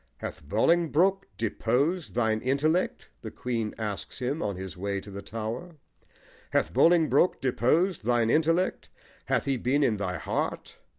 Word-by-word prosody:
"Hath -, -, -7 dB
Bolingbroke 170 Hz, -, +2 dB
deposed 130 Hz, -, 0 dB
thine 110 Hz, -2 st, +1 dB
intellect?" 150 Hz, +7 st, 0 dB
the -, -, -6 dB
Queen 115 Hz, -4 st, -3 dB
asks 105 Hz, -3 st, -4 dB
him, 135 Hz, +5 st, -2 dB
on 100 Hz, -, -2 dB
his 95 Hz, 0 st, -7 dB
way 100 Hz, +2 st, -2 dB
to 100 Hz, +1 st, -11 dB
the 100 Hz, +1 st, -6 dB
Tower: 115 Hz, -, -5 dB, 0.7 s
Hath 80 Hz, -, 0 dB
Bolingbroke 170 Hz, -, +4 dB
Deposed 145 Hz, -, +1 dB
thine 120 Hz, 0 st, +2 dB
intellect? 165 Hz, +4 st, +1 dB, 0.4 s
hath -, -, 0 dB
he 135 Hz, -2 st, +1 dB
been 135 Hz, +5 st, +1 dB
in 110 Hz, -6 st, +2 dB
thy 90 Hz, -3 st, -2 dB
heart? 80 Hz, -, -3 dB
125 Hz, 140 wpm, -27 LUFS, 110-160 Hz, 0.7 s, Bolingbroke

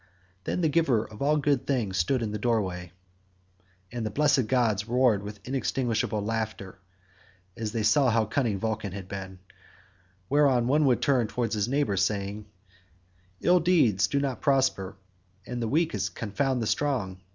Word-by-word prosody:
Then -, -, -1 dB
the 165 Hz, -, +3 dB
givers 140 Hz, -9 st, +1 dB
of 105 Hz, -, -12 dB
all 150 Hz, +2 st, +3 dB
good 145 Hz, -3 st, 0 dB
things 115 Hz, -9 st, -1 dB
stood 115 Hz, +9 st, +1 dB
in 105 Hz, -, -3 dB
the 105 Hz, -, -4 dB
doorway, 95 Hz, -7 st, -1 dB, 1.0 s
and 120 Hz, -1 st, -4 dB
the 110 Hz, -, -2 dB
blessed 140 Hz, 0 st, +2 dB
gods 110 Hz, -5 st, +1 dB
roared 120 Hz, -4 st, +3 dB
with 105 Hz, 0 st, -8 dB
inextinguishable 125 Hz, -5 st, -1 dB
laughter, 110 Hz, -3 st, -4 dB, 0.8 s
as 110 Hz, -2 st, -4 dB
they 115 Hz, -1 st, -2 dB
saw 125 Hz, +6 st, +4 dB
how 110 Hz, -1 st, +2 dB
cunning 110 Hz, -2 st, -1 dB
Vulcan 110 Hz, -2 st, -3 dB
had 95 Hz, -2 st, -7 dB
been, 95 Hz, -1 st, -7 dB, 0.9 s
whereon 140 Hz, -4 st, +3 dB
one 145 Hz, +4 st, +3 dB
would 125 Hz, -3 st, +2 dB
turn 130 Hz, -5 st, +2 dB
towards 115 Hz, 0 st, -2 dB
his 105 Hz, -1 st, 0 dB
neighbour 130 Hz, -7 st, 0 dB
saying: 100 Hz, +1 st, -1 dB, 0.9 s
"Ill 180 Hz, +1 st, +4 dB
deeds 155 Hz, -, +3 dB
do 140 Hz, -, 0 dB
not 135 Hz, -3 st, -2 dB
prosper, 130 Hz, -10 st, +1 dB, 0.5 s
and 125 Hz, -1 st, -5 dB
the 115 Hz, -, -1 dB
weak 160 Hz, +6 st, +1 dB, 0.2 s
confound 125 Hz, +3 st, -1 dB
the -, -, -2 dB
strong. 105 Hz, -9 st, -1 dB
115 Hz, 160 wpm, -27 LUFS, 105-135 Hz, 1.0 s, saw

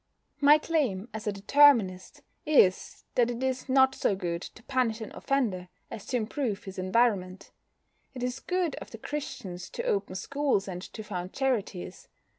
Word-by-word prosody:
My 290 Hz, +1 st, +7 dB
claim, 260 Hz, -, -1 dB
as 220 Hz, 0 st, -6 dB
a -, -, +2 dB
Determinist, 205 Hz, -3 st, +3 dB, 0.2 s
is 265 Hz, -12 st, +3 dB
that 240 Hz, -1 st, +3 dB
it 240 Hz, +1 st, -4 dB
is 260 Hz, +1 st, -2 dB
not 265 Hz, 0 st, +5 dB
so 200 Hz, -, +1 dB
good 175 Hz, -3 st, -3 dB
to 225 Hz, -, -11 dB
punish 250 Hz, -4 st, 0 dB
an 220 Hz, -, -7 dB
offender 210 Hz, -10 st, -1 dB, 0.2 s
as 210 Hz, -, -8 dB
to 255 Hz, -, 0 dB
improve 220 Hz, -2 st, -2 dB
his 190 Hz, 0 st, -8 dB
environment. 185 Hz, -2 st, 0 dB, 0.6 s
It 250 Hz, -, -5 dB
is 250 Hz, +1 st, -2 dB
good 360 Hz, -3 st, -1 dB
of -, -, -8 dB
the 225 Hz, -, -9 dB
Christians 195 Hz, -9 st, -6 dB
to -, -, -5 dB
open 200 Hz, -2 st, -1 dB
schools 275 Hz, -2 st, 0 dB
and 180 Hz, -2 st, -5 dB
to 215 Hz, +3 st, -8 dB
found 185 Hz, -3 st, -5 dB
charities. 210 Hz, -9 st, -2 dB
225 Hz, 165 wpm, -28 LUFS, 190-265 Hz, 0.6 s, My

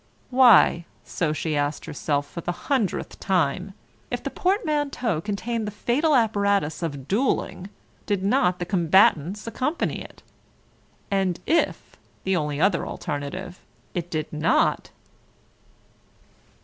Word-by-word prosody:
Why, 240 Hz, -9 st, +6 dB, 0.2 s
so 165 Hz, -4 st, -1 dB
she 155 Hz, 0 st, -2 dB
asked 145 Hz, +1 st, -1 dB
herself 145 Hz, -2 st, -2 dB
for 170 Hz, -, -7 dB
the 175 Hz, -, -2 dB, 0.2 s
hundredth 225 Hz, -8 st, -1 dB
time, 185 Hz, +1 st, 0 dB, 0.3 s
if -, -, -4 dB
the -, -, -3 dB
portmanteau 295 Hz, -, 0 dB
contained 220 Hz, +3 st, -3 dB
the -, -, -1 dB
fatal 260 Hz, +9 st, +1 dB
apparatus 200 Hz, -, +1 dB
of 145 Hz, -5 st, -4 dB
duelling, 205 Hz, -4 st, -1 dB, 0.4 s
did 200 Hz, -3 st, 0 dB
not 195 Hz, -4 st, +2 dB
the 175 Hz, -, -3 dB
combatants 180 Hz, +1 st, +3 dB
accompany 260 Hz, +7 st, -2 dB
it? -, -, -12 dB, 0.9 s
And 190 Hz, -3 st, +1 dB
if 330 Hz, +1 st, 0 dB, 0.3 s
(the 190 Hz, 0 st, +1 dB
only 150 Hz, -3 st, -1 dB
other 185 Hz, -1 st, +2 dB
alternative) 175 Hz, +6 st, -5 dB, 0.3 s
it 175 Hz, -2 st, -3 dB
did 155 Hz, -2 st, -3 dB
not 155 Hz, +2 st, +1 dB
190 Hz, 120 wpm, -24 LUFS, 160-225 Hz, 0.9 s, Why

